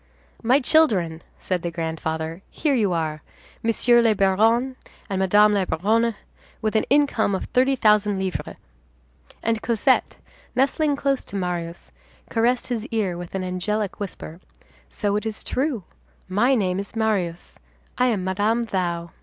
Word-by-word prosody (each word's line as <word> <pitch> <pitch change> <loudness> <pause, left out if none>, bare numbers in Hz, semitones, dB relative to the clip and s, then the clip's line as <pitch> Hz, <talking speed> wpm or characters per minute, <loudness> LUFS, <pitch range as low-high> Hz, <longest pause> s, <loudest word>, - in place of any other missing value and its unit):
"My 250 +4 +4
children," 210 - +2 0.2
said 180 -2 -2
the 170 - -2
grandfather, 160 0 -4
"here 295 -2 0
you 215 -7 +2
are, 155 -3 -2 0.4
Monsieur 240 +1 +4
le 225 -2 +3
Baron 225 +7 +2 0.4
and 190 - 0
Madame 210 +2 +5
la 200 -2 +2
Baronne, 220 +7 +1 0.4
with 215 0 -2
an 220 - +3
income 275 -8 +2
of - - -3
thirty 260 +2 +2
thousand 210 -4 +3
livres." 190 -1 -3 0.9
And 225 -1 0
Cosette, 240 +3 +1 0.4
nestling 280 +3 +2
close 275 -1 0
to - - -9
Marius, 175 -3 -4 0.4
caressed 240 +2 +1
his 235 -2 -3
ear 215 -8 -1
with 175 +1 -7
an 190 - -2
angelic 190 +3 -2
whisper: 180 -4 -7 0.5
"So 205 -2 -1
it 210 - -4
is 215 -1 -5
true. 260 - -1 0.4
My 225 +8 +3
name 190 -5 0
is 200 +3 -7
Marius. 195 -6 -1 0.4
I 250 - +2
am 210 -6 0
Madame 210 +5 0
Thou." 170 -5 -2
210 Hz, 145 wpm, -23 LUFS, 180-235 Hz, 0.9 s, Madame